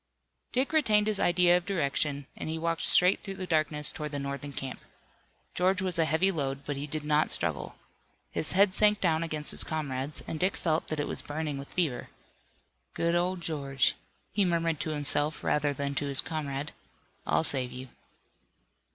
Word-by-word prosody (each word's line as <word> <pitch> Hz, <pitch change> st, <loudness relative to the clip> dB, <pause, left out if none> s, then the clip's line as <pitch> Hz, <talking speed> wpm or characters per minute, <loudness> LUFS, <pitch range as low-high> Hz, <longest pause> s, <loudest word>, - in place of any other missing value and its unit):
Dick 265 Hz, +4 st, 0 dB
retained 215 Hz, -9 st, +3 dB
his 215 Hz, -2 st, 0 dB
idea 175 Hz, 0 st, +4 dB
of 180 Hz, -, 0 dB
direction, 145 Hz, -5 st, -1 dB
and -, -, -6 dB
he 160 Hz, -, -3 dB
walked 165 Hz, 0 st, -2 dB
straight 180 Hz, +2 st, +7 dB
through 195 Hz, -2 st, -6 dB
the 190 Hz, -, -5 dB
darkness 155 Hz, -3 st, +3 dB
toward 150 Hz, -1 st, -6 dB
the 145 Hz, -, -3 dB
Northern 140 Hz, +1 st, -5 dB
camp. 135 Hz, -1 st, -6 dB, 0.7 s
George 185 Hz, +1 st, +1 dB
was 185 Hz, -2 st, +1 dB
a 165 Hz, -, +4 dB
heavy 160 Hz, +5 st, +2 dB
load, 140 Hz, -4 st, -4 dB
but 145 Hz, -, -3 dB
he 140 Hz, +2 st, -4 dB
did 155 Hz, +1 st, -4 dB
not 150 Hz, +1 st, +2 dB
struggle. -, -, -1 dB, 0.6 s
His 155 Hz, -, 0 dB
head 195 Hz, 0 st, +4 dB
sank 210 Hz, 0 st, +3 dB
down 160 Hz, -3 st, +1 dB
against 155 Hz, -2 st, +2 dB
his -, -, +3 dB
comrade's 145 Hz, -2 st, -2 dB
and 160 Hz, -, -5 dB
Dick 185 Hz, +4 st, 0 dB
felt 160 Hz, -2 st, -1 dB
that 155 Hz, -, -2 dB
it 145 Hz, -, -1 dB
was -, -, -5 dB
burning 150 Hz, -1 st, -4 dB
with 140 Hz, -, -10 dB
fever. 160 Hz, -9 st, -1 dB, 0.9 s
"Good 170 Hz, 0 st, 0 dB
old 175 Hz, +1 st, 0 dB
George," 140 Hz, -5 st, 0 dB, 0.4 s
he 205 Hz, -, +2 dB
murmured 165 Hz, -3 st, 0 dB
to -, -, -3 dB
himself 150 Hz, 0 st, -1 dB
rather 145 Hz, -1 st, +1 dB
than 140 Hz, 0 st, -3 dB
to 140 Hz, +1 st, -2 dB
his 140 Hz, -1 st, +3 dB
comrade, 145 Hz, -1 st, -2 dB, 0.6 s
"I'll -, -, +2 dB
save 130 Hz, -5 st, -1 dB
you." 130 Hz, +1 st, -8 dB
155 Hz, 185 wpm, -28 LUFS, 145-180 Hz, 0.9 s, straight